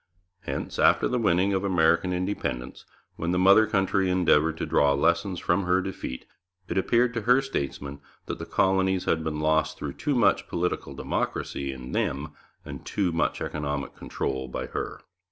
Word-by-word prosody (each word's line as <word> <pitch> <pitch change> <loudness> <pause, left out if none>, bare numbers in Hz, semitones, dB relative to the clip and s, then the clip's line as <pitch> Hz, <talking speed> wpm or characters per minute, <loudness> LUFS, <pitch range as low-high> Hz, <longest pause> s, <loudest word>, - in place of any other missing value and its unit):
Hence, - - -5
after - - +4
the 125 - 0
winning 95 -2 +2
of 95 0 0
American 85 -1 +2
independence, 90 -9 -3 0.3
when 80 - -2
the 90 - +1
mother 100 +4 +6
country 95 -2 +1
endeavoured 80 -3 +3
to - - -2
draw 70 -1 +3
lessons 85 +6 +1
from 90 +2 +1
her 90 +1 +3
defeat, 95 -9 -5 0.4
it - - -3
appeared 115 +5 +2
to 115 - -2
her 125 +4 +4
statesmen 70 - -4 0.2
that - - -5
the - - -6
colonies 95 -1 +2
had 80 -1 +1
been 75 -1 -3
lost 80 +1 +1
through 70 -2 -5
too 145 - -1
much 120 - +3
political 90 +1 -2
democracy 70 -1 -3
in 65 -1 -8
them 70 +3 -1 0.4
and - - -8
too 95 -4 -1
much 85 - -1
economic 70 -2 -3
control 65 -1 -3
by 65 - -4
her. - - -5
90 Hz, 170 wpm, -26 LUFS, 75-95 Hz, 0.4 s, mother